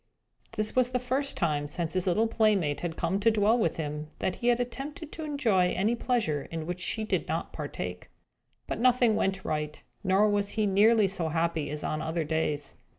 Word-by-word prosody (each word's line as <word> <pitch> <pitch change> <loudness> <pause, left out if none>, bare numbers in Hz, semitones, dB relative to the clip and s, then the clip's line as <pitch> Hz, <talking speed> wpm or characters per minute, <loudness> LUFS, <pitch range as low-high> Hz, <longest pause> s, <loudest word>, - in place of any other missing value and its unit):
This 215 -1 -2
was 255 -1 +3
the 250 0 0
first 260 +3 -2
time, 150 -4 0
since 165 +2 -2
his 185 0 0
little 210 +5 +3
playmate 210 -10 +2
had 170 -2 -4
come 175 +4 0
to 220 +3 +4
dwell 215 +1 +3
with 170 -8 0
him, 150 -1 -4
that 185 - -2
he 240 - -2
had 240 0 +4
attempted 270 +6 -5
to 320 - -6
enjoy 235 -12 +2
any 210 +5 +1
pleasure 230 - 0
in 165 -1 -4
which 180 +1 -4
she 220 +4 -2
did 215 - -1
not - - -3
partake. - - -5 0.6
But - - -4
nothing 245 -2 +4
went 190 -1 0
right; 150 -1 -2 0.2
nor 195 +2 +4
was 205 -1 +1
he 215 - +3
nearly 210 +2 +5
so 175 -4 -2
happy 165 -2 0
as 150 +1 -4
on 155 - -2
other 160 +1 -1
days. 150 -2 -1
195 Hz, 200 wpm, -28 LUFS, 160-230 Hz, 0.6 s, nearly